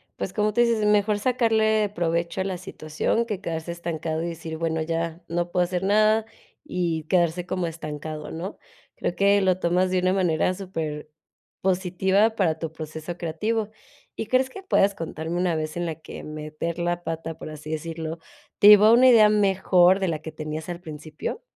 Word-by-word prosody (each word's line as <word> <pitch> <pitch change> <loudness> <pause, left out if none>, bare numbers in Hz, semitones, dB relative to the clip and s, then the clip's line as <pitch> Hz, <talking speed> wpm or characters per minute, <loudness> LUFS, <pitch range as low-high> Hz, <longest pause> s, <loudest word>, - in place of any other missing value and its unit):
pues, 185 - -4
como 210 -1 +1
tú 240 - +3
dices, 235 -2 +3
es - - +1
mejor 210 0 +3
sacarle 220 -3 +2
provecho 170 +1 -1
a - - -2
la 185 -2 -3
situación 170 +6 -2
que 205 -4 -4
quedarse 165 -1 -4
estancado, 165 -1 -3
y - - -2
decir: 160 -1 -6
"Bueno, 160 -1 -1
ya, 165 +1 -3
no 175 +1 -2
puedo 180 -1 +2
hacer 180 +1 -3
nada", 215 +2 +3 0.4
y 170 -3 -2
quedarse 175 -1 +2
como 185 -2 -2
estancado, 155 -1 -6
¿no? 175 +5 -6 0.4
Creo - - -2
que 200 0 +4
lo 185 -1 +2
tomas 180 +2 +1
de 185 - +2
una 185 +1 +2
manera 180 -1 +1
superpositiva 185 +4 -2
para 160 -5 +1
tu 165 -2 -4
proceso 160 +2 -7
creativo. 210 +7 -2 0.5
Y, 225 - -4
¿crees 255 +1 +2
que 390 +7 -10
puedas 200 - +2
contarme 165 0 -5
una 175 -2 +1
vez 155 +1 -4
en 175 - -1
la 160 -2 -3
que 155 - -10
meter 155 +2 -5
la 175 0 -1
pata, 165 0 -5
por - - -8
así 155 0 -8
decirlo, 160 +1 -4 0.4
te 205 - +8
llevó 210 0 +9
a 225 - +7
una 255 +2 +7
idea 220 -3 +7
mejor 190 -2 +4
de 190 - 0
la 155 -2 -2
que 160 0 -8
tenías 155 +1 -6
al 175 0 -5
principio? 155 - -6
175 Hz, 185 wpm, -24 LUFS, 160-200 Hz, 0.5 s, llevó